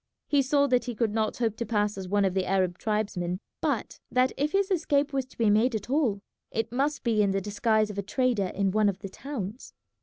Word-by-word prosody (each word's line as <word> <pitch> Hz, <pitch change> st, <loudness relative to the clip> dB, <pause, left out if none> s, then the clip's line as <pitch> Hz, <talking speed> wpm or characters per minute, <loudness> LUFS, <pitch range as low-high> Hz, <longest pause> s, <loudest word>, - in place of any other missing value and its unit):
He 285 Hz, -1 st, +3 dB
saw 280 Hz, +2 st, +3 dB
that 250 Hz, -3 st, +2 dB
he 245 Hz, -2 st, -4 dB
could 220 Hz, -2 st, 0 dB
not 220 Hz, -1 st, 0 dB
hope 225 Hz, -3 st, 0 dB
to -, -, -1 dB
pass 210 Hz, -2 st, +1 dB
as 190 Hz, -1 st, -6 dB
one 200 Hz, +1 st, +2 dB
of 190 Hz, -, +1 dB
the 190 Hz, -1 st, 0 dB
Arab 185 Hz, -2 st, +1 dB
tribesmen, 200 Hz, -5 st, -1 dB, 0.2 s
but -, -, -1 dB
that 255 Hz, +1 st, +3 dB
if 290 Hz, +2 st, 0 dB
his 395 Hz, 0 st, +1 dB
escape 295 Hz, -5 st, +1 dB
was 265 Hz, -2 st, -1 dB
to -, -, -20 dB
be 225 Hz, -3 st, +3 dB
made 225 Hz, +3 st, +3 dB
at 215 Hz, +3 st, -4 dB
all 240 Hz, -9 st, +1 dB, 0.3 s
it 225 Hz, 0 st, -2 dB
must 280 Hz, +4 st, 0 dB
be 225 Hz, -3 st, +2 dB
in 200 Hz, -, +3 dB
the 195 Hz, 0 st, +1 dB
disguise 215 Hz, +2 st, +1 dB
of 200 Hz, -, -5 dB
a -, -, +1 dB
trader 210 Hz, -1 st, 0 dB
in 195 Hz, +1 st, 0 dB
one 210 Hz, +1 st, +3 dB
of 190 Hz, -, -3 dB
the 195 Hz, -, -6 dB
towns. 235 Hz, -2 st, -6 dB
220 Hz, 240 wpm, -27 LUFS, 200-260 Hz, 0.3 s, He